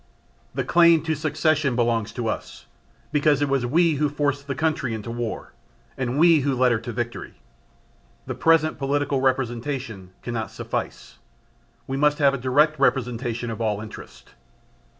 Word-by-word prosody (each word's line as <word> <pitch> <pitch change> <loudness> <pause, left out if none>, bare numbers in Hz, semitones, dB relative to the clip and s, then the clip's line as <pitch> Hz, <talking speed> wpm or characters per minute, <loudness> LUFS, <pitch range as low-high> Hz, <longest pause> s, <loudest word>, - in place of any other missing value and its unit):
The - - 0
claim 170 -2 +5
to 160 -1 0
succession 155 -2 0
belongs 115 -3 0
to 120 -2 -3
us, - - -5 0.5
because 150 -1 +3
it 145 - +1
was 135 -3 0
we 165 +2 +3
who 150 +1 +1
forced 145 -1 -2
the 140 - -3
country 155 -7 -1
into 110 +1 -6
War 120 -1 -5 0.4
and 130 0 -2
we 165 0 +6
who 140 -1 0
led 125 0 +3
her 115 - +1
to 120 +2 -6
victory. 120 +1 -5 0.9
The - - -4
present 160 -1 +2
political 140 0 0
representation 125 -5 -2
cannot 115 -3 -3
suffice: - - -6 0.7
we 135 - -3
must 150 +1 +3
have 140 -2 +4
a 140 - -3
direct 145 +5 +2
representation 120 -2 0
of 115 - -6
all 105 -2 0
interest. 110 0 -11
135 Hz, 155 wpm, -24 LUFS, 120-150 Hz, 0.9 s, we